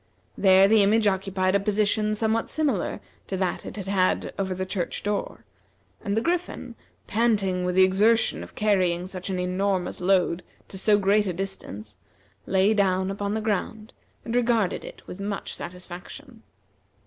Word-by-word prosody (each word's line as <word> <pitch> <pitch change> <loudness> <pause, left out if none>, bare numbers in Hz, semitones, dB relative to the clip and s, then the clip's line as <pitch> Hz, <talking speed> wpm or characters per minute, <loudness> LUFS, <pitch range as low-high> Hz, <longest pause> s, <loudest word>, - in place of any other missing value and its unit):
There 190 0 +6
the 220 0 +5
image 215 +2 +3
occupied 190 -1 +1
a 200 - +4
position 210 +1 +1
somewhat 220 +1 0
similar 280 - -1 0.3
to 190 - -3
that 185 -1 -2
it - - -7
had 200 - -5
had 190 -1 +1
over 190 -1 -1
the 185 +1 -3
church 185 -2 -3
door; 205 0 -3 0.6
and 205 -1 -1
the - - +2
Griffin, 350 +5 -2 0.3
panting 200 -5 +1
with 180 0 -1
the 190 - +7
exertion 210 +5 +3
of - - -11
carrying 185 -4 +1
such 185 0 -6
an 190 - -1
enormous 185 +1 -1
load 180 -2 +2 0.3
to 190 - -8
so 205 +1 +4
great 205 +1 +2
a 185 - -1
distance, 135 - -6 0.5
lay 190 +3 +3
down 190 -2 +1
upon 200 +1 -2
the 220 - -1
ground, 215 +1 -3 0.3
and 230 - -3
regarded 230 -5 +1
it - - -11
with 180 - -9
much 200 0 -4
satisfaction. 180 +8 -9
195 Hz, 160 wpm, -25 LUFS, 185-215 Hz, 0.6 s, the